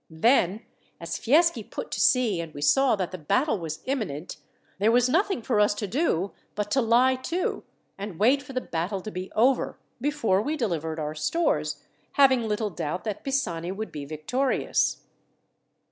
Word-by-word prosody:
Then, 195 +3 +2 0.3
as - - -4
Fieschi 305 0 +3
put - - -7
to - - -3
sea 230 -9 +3
and 165 -2 -9
we 145 - -6
saw 270 - +4
that 185 -4 -3
the 185 - -6
battle 220 - +1
was 160 -2 -6
imminent, 205 - -3 0.4
there 210 +3 +4
was 245 +1 +4
nothing 345 - +1
for 225 -3 +1
us 205 0 +3
to 210 - -3
do 200 - 0 0.2
but 210 0 -3
to 270 - +3
lie 240 +3 +4
to, 335 +8 -2 0.4
and 200 -4 -6
wait 255 +8 +4
for 270 -1 -11
the 255 - -1
battle 185 +2 -3
to 215 - -7
be 185 0 -6
over, 250 +4 +2 0.2
before 245 -9 +1
we 305 +7 -2
delivered 165 - -2
our 150 0 -3
stores, 155 - 0 0.3
having 260 -5 +4
little 210 0 -1
doubt 160 +2 -4
that 210 -3 -4
Pisani 180 -11 -1
would 215 +3 -5
be 150 -2 -6
victorious." 205 - 0
215 Hz, 175 wpm, -26 LUFS, 175-260 Hz, 0.4 s, saw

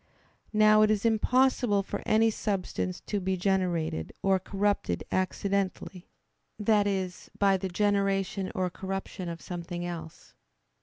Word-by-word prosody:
Now 215 0 +5
it 215 - +5
is 215 0 +1
impossible 230 -2 +3
for - - -5
any 225 +1 +4
substance 180 - -2
to 205 - -2
be 190 0 -1
generated 175 - 0
or 195 -1 +3
corrupted 195 - -1
accidentally, 190 -1 -2 0.5
that 210 -1 +3
is, 190 -3 -3
by 195 -1 +4
the 190 0 -4
generation 195 0 0
or 185 -1 0
corruption 190 -1 -5
of 170 0 -6
something 175 0 -5
else. 165 -2 -8
195 Hz, 130 wpm, -28 LUFS, 180-205 Hz, 0.5 s, Now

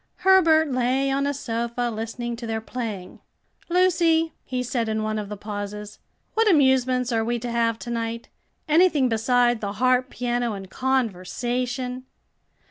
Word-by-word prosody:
Herbert 320 -5 +5
lay 255 +2 +1
on 275 +1 0
a - - +1
sofa 235 -2 -2
listening 230 +2 -4
to 235 -1 -6
their 225 0 -2
playing. 220 -5 -6 0.5
"Lucy," 340 -2 +3
he 255 -1 -3
said 235 -2 -1
in 220 0 -1
one 215 0 -1
of 205 -1 -6
the 210 - -6
pauses, 205 0 -6 0.3
"what 445 -1 +3
amusements 260 -5 +3
are 225 -1 +1
we 240 +2 -1
to 240 +1 -5
have 230 -1 +1
to 240 - -7
night? 230 0 -3 0.4
anything 310 -4 +4
beside 240 +1 +2
the 200 -1 -3
harp, 255 +3 +2
piano, 240 -2 -1
and 195 -2 -8
conversation?" 250 +2 -2
245 Hz, 150 wpm, -24 LUFS, 225-265 Hz, 0.5 s, Herbert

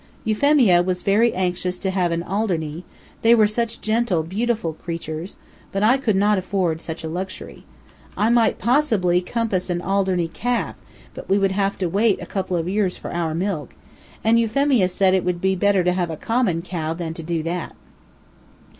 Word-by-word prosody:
Euphemia 220 -5 +4
was 180 0 -2
very 220 +4 +3
anxious 180 0 -1
to 190 +1 -2
have 180 -2 0
an 170 0 -1
Alderney, 175 -5 -2 0.4
they 230 +1 +6
were 220 -2 +5
such 230 +2 -2
gentle, 220 -6 +1
beautiful 210 0 -1
creatures, 165 +1 -6 0.4
but 195 +1 -1
I 245 +5 +4
could 220 -6 +1
not 205 +1 +3
afford 180 -4 -1
such 160 -1 -6
a - - -3
luxury. 185 +4 -6 0.5
I 220 +3 +2
might 235 -2 +3
possibly 215 -8 +2
compass 200 -2 -2
an 175 -1 0
Alderney 190 -1 0
calf, 240 +9 -2 0.4
but - - -10
we 195 - +4
would 195 -1 +2
have 195 0 0
to 190 - -1
wait 200 +4 +2
a - - -7
couple 185 -2 -2
of 165 0 -2
years 195 -1 0
for - - -7
our 165 -2 -1
milk, 170 -6 -3 0.5
and 225 +1 +4
Euphemia 230 -3 +2
said 185 +1 +2
it 190 - +2
would 180 -1 -1
be 190 +1 +1
better 195 0 +2
to 180 0 +2
have 180 -2 -1
a 160 - -5
common 225 -8 0
cow 165 -3 -3
than 165 -1 -4
to 165 - -7
do 165 0 -2
that. 170 +1 -4
190 Hz, 185 wpm, -22 LUFS, 175-215 Hz, 0.5 s, they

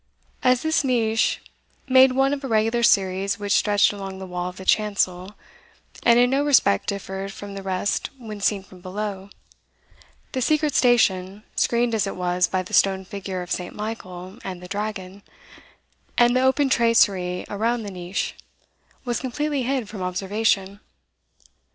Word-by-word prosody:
As 255 -1 +3
this 315 -1 +1
niche 225 -4 +1 0.4
made 260 0 +6
one 270 +2 +2
of 285 -1 -4
a - - -3
regular 225 +1 +1
series 195 -3 +2
which 205 -1 -4
stretched 205 0 +3
along 195 -1 -7
the 190 - -7
wall 180 0 -4
of 180 - -13
the 190 - -9
chancel, 200 -2 0 0.7
and 235 0 +5
in 245 +1 +4
no 275 +2 +2
respect 270 - +3
differed 195 0 -4
from 200 +1 -9
the 195 - -6
rest 190 +1 -1
when 215 -5 -8
seen 200 -1 +1
from 185 -1 -16
below, 195 +1 -5 1.0
the 260 - -2
secret 305 +2 +1
station, 205 -6 +2
screened 235 0 +1
as 215 -2 +1
it - - -4
was 180 0 +1
by 185 -1 -1
the 180 - -12
stone 190 -1 +3
figure 190 -2 -5
of 175 - -11
St. 180 -1 -3
Michael 190 -3 -7
and 185 -2 -6
the 180 - -10
dragon, 200 -1 -5 1.0
and 240 0 +5
the 255 - +3
open 265 +2 +3
tracery 200 -8 +2
around 225 +3 -1
the 205 - -6
niche, 180 +1 -3 0.7
was 240 -1 -1
completely 285 +2 -2
hid 255 -2 -1
from 205 -2 -8
observation. 195 +2 -1
205 Hz, 160 wpm, -23 LUFS, 190-240 Hz, 1.0 s, made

